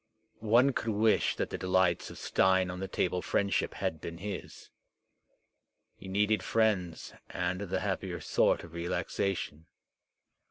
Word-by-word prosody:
One 120 +5 +4
could 115 - -2
wish 110 +1 +3
that - - -2
the - - -4
delights 95 -2 +2
of - - -10
stein 95 -1 +2
on 90 - -6
the 95 - -3
table 90 -1 0
friendship 100 +2 0
had 80 -1 -2
been 85 0 -6
his. 100 +3 -7 1.2
He - - -12
needed 105 +3 +2
friends 100 -7 0 0.2
and 90 +1 -2
the 100 - -2
happier - - -2
sort - - +2
of 85 - -12
relaxation. 85 -1 -2
95 Hz, 135 wpm, -31 LUFS, 90-105 Hz, 1.2 s, One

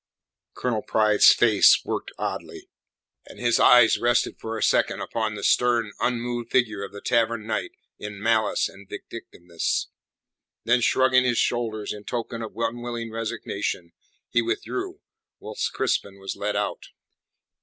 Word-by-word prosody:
Colonel 115 -4 -1
Pride's 105 -1 +5
face 110 -4 +5
worked - - -4
oddly, - - -6 0.6
and - - -13
his 120 -1 +2
eyes 120 -2 +6
rested 120 +1 +1
for 110 0 -5
a - - -2
second - - +2
upon 110 -2 -3
the 100 - -7
stern, 120 -3 +2
unmoved 120 -1 -2
figure 110 -6 +1
of 100 - -7
the 100 0 -10
Tavern 115 -2 0
Knight 110 -1 -3 0.3
in 105 -1 -7
malice 110 +1 +1
and 100 0 -15
vindictiveness. 85 -1 -4 0.7
Then, 120 +1 +2
shrugging 130 +1 +3
his 120 -2 +1
shoulders 110 -3 -1
in 105 -1 -11
token 115 -1 -4
of 110 -3 -7
unwilling 120 -1 -3
resignation, 105 -5 -4 0.4
he 120 - +1
withdrew, 375 - -4 0.4
whilst - - -4
Crispin 100 -1 -1
was 95 0 -5
led - - -3
out. - - -3
115 Hz, 140 wpm, -24 LUFS, 105-120 Hz, 0.7 s, eyes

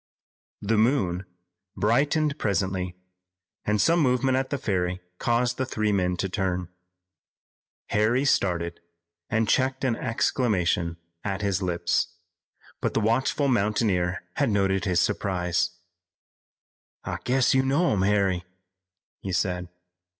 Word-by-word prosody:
The 110 +1 +2
moon 100 -7 +1 0.5
brightened 145 +7 +2
presently, 95 -3 -1 0.7
and 105 0 +1
some 165 +7 +4
movement 130 -2 +2
at 130 0 0
the 140 - -1
ferry 90 -6 -1 0.2
caused 120 +1 +1
the 130 - 0
three 110 -4 0
men 90 -3 +1
to 95 - -1
turn. 90 -3 -2 1.2
Harry 115 +6 +2
started 85 -9 +1 0.5
and 110 -1 +1
checked 130 +3 +1
an 125 -3 +2
exclamation 90 -9 0 0.3
at 100 0 -3
his 100 -1 0
lips. 85 -1 0 0.6
But - - -2
the - - +3
watchful 125 +6 +1
mountaineer 105 -6 +1
had 140 -3 +2
noted 95 -2 +1
his 90 -3 +2
surprise. 90 -2 0 1.3
"I - - -4
guess 130 0 +3
you 130 - +4
know 140 +7 +2
'em, 100 - +1
Harry," 95 -3 +2 0.8
he 95 - -5
said. 90 -1 -1
105 Hz, 120 wpm, -26 LUFS, 90-125 Hz, 1.3 s, some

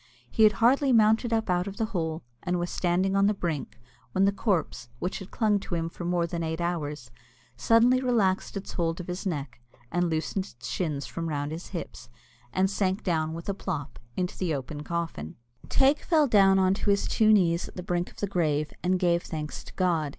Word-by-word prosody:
He - - 0
had 215 -1 +7
hardly 265 +5 +3
mounted 225 +1 +4
up 225 -1 +1
out 180 0 +1
of 200 - -6
the 225 - +1
hole, 160 -3 -2 0.2
and 180 0 -1
was 175 0 -2
standing 185 +2 +1
on 195 0 +4
the 210 - +2
brink, 165 -10 -4 0.3
when 190 0 +3
the 200 - +4
corpse, 175 - -1
which 180 +9 -3
had 190 - -9
clung 210 -3 +2
to 185 - -4
him 165 0 -1
for 175 - -8
more 175 -1 +1
than 170 0 -4
eight 160 0 -2
hours, 150 -7 -3 0.4
suddenly 235 - +4
relaxed 210 -7 +1
its 195 - -7
hold 165 -1 -1
of 180 - -5
his 180 +2 -4
neck, 140 -8 -4 0.3
and 175 0 +1
loosened 165 +4 -1
its 120 - -8
shins 150 -6 -2
from 165 -1 -4
round 145 -1 -2
his 165 +2 -6
hips, - - -7 0.4
and 190 +1 +2
sank 190 0 -1
down 160 -3 0
with 165 - -8
a 200 - 0
plop 155 -7 -5 0.2
into 180 -1 -1
the 170 -5 -1
open 140 +2 -5
coffin. 165 - -4 0.3
Teig 275 +2 +4
fell 315 -4 +3
down 195 -4 +5
on 190 0 +4
his 200 0 +1
two 215 -1 +4
knees 175 -5 +3
at - - -13
the 180 - -5
brink 175 0 -1
of - - -20
the - - +2
grave, 155 -6 0
and 185 +1 +2
gave 175 -2 +2
thanks 155 -3 -5
to - - -12
God. 170 -5 +1
180 Hz, 210 wpm, -27 LUFS, 165-200 Hz, 0.4 s, had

